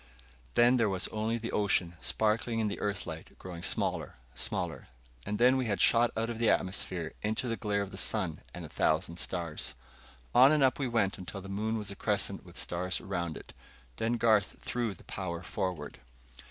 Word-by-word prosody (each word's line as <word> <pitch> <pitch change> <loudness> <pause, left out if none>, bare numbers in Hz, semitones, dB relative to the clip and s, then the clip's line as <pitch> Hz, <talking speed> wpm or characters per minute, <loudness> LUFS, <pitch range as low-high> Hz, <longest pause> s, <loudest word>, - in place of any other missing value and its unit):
Then 120 +2 +6
there 115 -3 +3
was 95 -2 0
only 110 +2 -1
the 115 0 -4
ocean, 95 -4 +2
sparkling 110 +2 +1
in 110 -2 +1
the 100 - -4
Earth 105 -1 -2
light, 80 -1 -8
growing 90 -2 -8
smaller, - - 0 0.2
smaller. 80 -1 -2 0.4
And 105 0 -1
then 125 +3 +5
we 130 -2 0
had 100 -2 0
shot 120 0 +5
out 115 +1 +1
of 115 -1 -4
the 115 - +4
atmosphere 90 -3 0
into 110 +4 -1
the 115 - 0
glare 105 -2 0
of 100 - -8
the - - -7
sun 95 -8 +1
and - - -7
a - - -7
thousand 80 +2 +1
stars. 85 -7 -1 0.6
On 130 +3 +8
and 150 -2 +4
up 130 +1 +3
we 135 - 0
went, 110 -5 +1
until 95 +2 -6
the 95 - -9
moon 110 +3 -1
was 105 -2 -4
a - - -7
crescent - - 0
with - - -11
stars 90 +1 -1
around 85 -2 -3
it. - - -11 0.4
Then 115 +1 +1
Garth 110 -4 +3
threw 120 -5 -2
the - - -17
power 85 -2 -4
forward. 90 -7 -3
105 Hz, 195 wpm, -31 LUFS, 90-115 Hz, 0.6 s, On